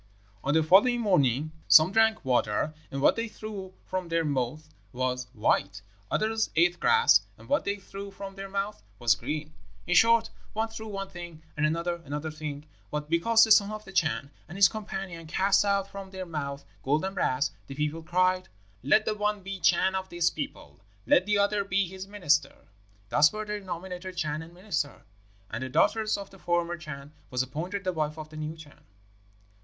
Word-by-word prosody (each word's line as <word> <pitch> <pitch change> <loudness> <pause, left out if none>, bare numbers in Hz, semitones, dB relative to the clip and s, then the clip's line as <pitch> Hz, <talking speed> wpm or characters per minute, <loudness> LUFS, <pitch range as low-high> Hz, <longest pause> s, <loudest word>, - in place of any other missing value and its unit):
"On 140 +3 +1
the 160 - +4
following 205 +9 +5
morning 155 - +2 0.2
some 160 +3 +8
drank 220 -2 +3
water, 125 +3 +1 0.2
and 135 0 -4
what - - +6
they 230 0 -2
threw 205 -4 -8
from 185 -1 -3
their 165 -1 0
mouths 145 +2 -2 0.3
was 125 0 -2
white; 100 -4 0 0.3
others 220 +1 0
ate 175 +2 +3
grass, 460 0 +5 0.2
and - - -15
what 290 - +1
they 200 - 0
threw 200 0 -8
from 195 0 -8
their 195 0 -7
mouths 200 +2 -3 0.2
was 120 -1 +4
green. 150 +7 -4 0.3
In 180 - 0
short, 230 +4 +5 0.2
one 220 +1 -1
threw 220 0 -8
one 195 -2 -5
thing, 175 -3 -9
and 150 0 +2
another 170 +2 -2
another 150 +2 -4
thing. 150 -1 -6 0.2
But 150 +1 -4
because 225 +7 +5
the 220 - +2
son 200 -1 +7
of 215 0 -6
the 195 - -10
Chan 160 -5 0 0.2
and 175 - -8
his 195 -1 +8
companion 195 -6 -6
cast 195 +4 +3
out 200 -1 +1
from 195 -1 -8
their 190 -1 -6
mouths 140 -4 -5 0.2
gold 150 +6 +1
and 190 - -3
brass, 130 -6 0 0.2
the 135 - -7
people 150 +2 -2
cried, 185 +2 +1 0.3
'Let 215 - +4
the 215 - +1
one 210 -1 -1
be 195 0 -5
Chan 180 +2 +3
of 190 0 -3
this 175 -1 +1
people 70 +4 -7 0.3
let 185 +3 +4
the 210 0 +3
other 200 0 +2
be 195 -1 +1
his 190 +2 -8
minister.' 155 -8 0 0.4
Thus 150 +1 +5
were 215 0 -4
they 210 0 -3
nominated 180 0 -6
Chan 155 -2 -1
and 160 +1 -11
minister! 170 - -3 0.5
And 115 - -4
the 130 - -4
daughter 220 - +3 0.2
of 200 -1 -8
the 195 - -15
former 175 0 0
Chan 150 -3 -9 0.2
was 125 0 0
appointed 175 +10 -4
the 185 -1 -1
wife 155 -1 -2
of 155 -1 -7
the 155 - -11
new 155 +1 -4
Chan. 150 -2 -15
175 Hz, 190 wpm, -28 LUFS, 150-200 Hz, 0.5 s, some